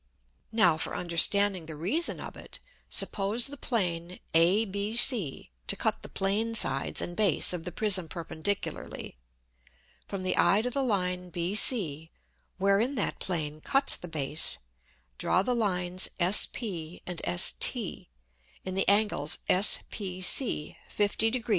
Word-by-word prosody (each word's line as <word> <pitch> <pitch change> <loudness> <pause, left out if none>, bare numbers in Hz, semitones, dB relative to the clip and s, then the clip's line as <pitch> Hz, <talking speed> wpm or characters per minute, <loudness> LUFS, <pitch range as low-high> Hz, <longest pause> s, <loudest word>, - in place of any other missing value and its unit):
Now 215 -8 +4
for - - -5
understanding 180 +1 +3
the 160 - -8
Reason 200 - -2
of - - -9
it, - - -12 0.3
suppose 210 +4 +1
the 285 - -6
Plane 180 -9 -3
ABC 200 - +2 0.2
to - - +1
cut - - -2
the - - -10
Plane 215 +4 -1
Sides 135 -10 +2
and 175 - -7
Base 195 -4 +2
of 170 -2 -6
the 180 - -5
Prism 185 -2 0
perpendicularly. 170 - -5 0.9
From 195 -2 -6
the 185 - -1
Eye 195 +5 +3
to 250 - -3
the 275 - -2
Line 180 -6 -2
BC, 170 - +2 0.5
wherein 200 +8 +1
that 210 - -2
Plane 155 -4 -4
cuts 275 - +2
the 180 - -10
Base, 155 -1 -2 0.6
draw 185 - +1
the 250 - -1
Lines 185 -5 0
S_p_ 180 -2 0
and 175 -2 -5
S_t_, 90 0 +3 0.6
in 185 - -4
the 195 +1 +1
Angles 200 -8 +1
S_pc_ 185 - +1
50 210 +2 0
degr. 240 0 -4
190 Hz, 130 wpm, -27 LUFS, 170-215 Hz, 0.9 s, Now